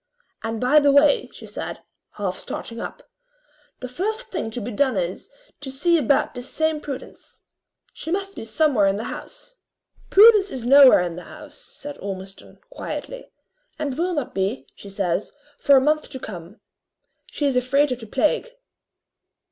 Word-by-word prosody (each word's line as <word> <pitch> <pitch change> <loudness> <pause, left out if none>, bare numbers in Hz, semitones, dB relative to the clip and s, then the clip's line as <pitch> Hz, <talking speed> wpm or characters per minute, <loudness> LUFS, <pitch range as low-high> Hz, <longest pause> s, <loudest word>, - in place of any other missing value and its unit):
And 225 0 -3
by 255 +6 +5
the 285 -1 +4
way," 285 +1 +4
she - - -12
said, - - -7 0.3
half 195 -3 -3
starting 230 +4 -7
up, - - -8 0.7
"the 255 - -4
first 430 - -4
thing 280 - -3
to 225 - -5
be 240 +2 -5
done 260 0 +1
is, 180 - -3 0.3
to 285 - -6
see 315 +6 +2
about 280 0 +1
this 245 0 -7
same 315 -1 0
Prudence. 275 -4 -9 0.5
She - - -8
must 390 +2 -2
be - - -7
somewhere 245 -4 +2
in 195 - +2
the 215 - -4
house." - - -12 0.5
"Prudence 415 -1 +7
is 250 -3 -5
nowhere 270 -4 +8
in 175 -1 -3
the 180 - -9
house," - - -12
said 290 0 -10
Ormiston, 195 -1 -8
quietly; - - -7 0.5
"and 295 -4 -3
will 350 +4 -1
not 290 -5 -3
be, 195 +6 -2
she 200 - -12
says, 195 -1 -2 0.3
far 280 -1 +6
a - - +5
month 305 +2 +1
to 265 - -6
come. 185 -2 -9 0.7
She 295 - -3
is 275 -2 +1
afraid 270 +3 +2
of 250 - -2
the 225 - -10
plague." 300 - 0
265 Hz, 170 wpm, -23 LUFS, 215-305 Hz, 0.7 s, nowhere